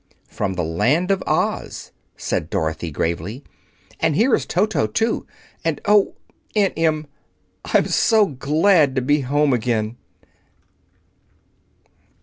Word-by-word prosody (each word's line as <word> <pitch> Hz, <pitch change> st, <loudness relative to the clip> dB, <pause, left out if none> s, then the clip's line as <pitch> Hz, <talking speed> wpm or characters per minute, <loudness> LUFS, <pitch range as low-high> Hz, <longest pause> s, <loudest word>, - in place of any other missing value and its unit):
"From 95 Hz, -2 st, -3 dB
the 90 Hz, -, -1 dB
Land 130 Hz, -, +1 dB
of 195 Hz, -, +1 dB
Oz," -, -, -2 dB, 0.3 s
said 80 Hz, -, -2 dB
Dorothy 80 Hz, +1 st, -2 dB
gravely. 85 Hz, -, -3 dB, 0.6 s
"And 160 Hz, -2 st, +1 dB
here 235 Hz, -, +3 dB
is -, -, +1 dB
Toto, 210 Hz, +4 st, +1 dB
too. 225 Hz, 0 st, -1 dB, 0.4 s
And 165 Hz, -3 st, -1 dB
oh, 205 Hz, -1 st, +3 dB, 0.4 s
Aunt 205 Hz, -2 st, +2 dB
Em! 155 Hz, -1 st, 0 dB, 0.6 s
I'm -, -, +2 dB
so 220 Hz, -2 st, +3 dB
glad 150 Hz, 0 st, +2 dB
to 130 Hz, -, +1 dB
be 145 Hz, +3 st, +2 dB
at -, -, -6 dB
home 145 Hz, +1 st, +2 dB
again!" 115 Hz, -1 st, -1 dB
145 Hz, 125 wpm, -21 LUFS, -, 0.6 s, here